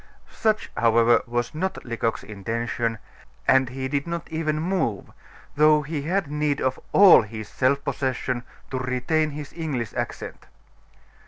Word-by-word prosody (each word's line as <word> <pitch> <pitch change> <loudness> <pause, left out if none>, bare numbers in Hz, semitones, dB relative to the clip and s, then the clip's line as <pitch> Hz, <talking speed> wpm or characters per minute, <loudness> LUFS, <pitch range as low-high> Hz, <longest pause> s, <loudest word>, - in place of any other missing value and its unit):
Such, 215 -1 0
however, 115 0 +4
was 120 +2 -2
not 185 +5 -3
Lecoq's 115 -1 -2
intention, 115 +2 -3 0.5
and 130 -1 +4
he 130 +1 -4
did 140 +3 -2
not 170 0 -4
even 155 -1 -1
move, 165 - -1 0.4
though 150 0 +5
he 150 0 -3
had 180 +5 0
need 150 0 -1
of 130 0 -1
all 195 -3 +8
his 110 0 -7
self 140 +2 +1
possession 130 -3 -2 0.3
to 130 - -2
retain 130 +5 0
his 145 -1 -8
English 140 -9 -3
accent. - - -5
135 Hz, 140 wpm, -24 LUFS, 120-155 Hz, 0.5 s, all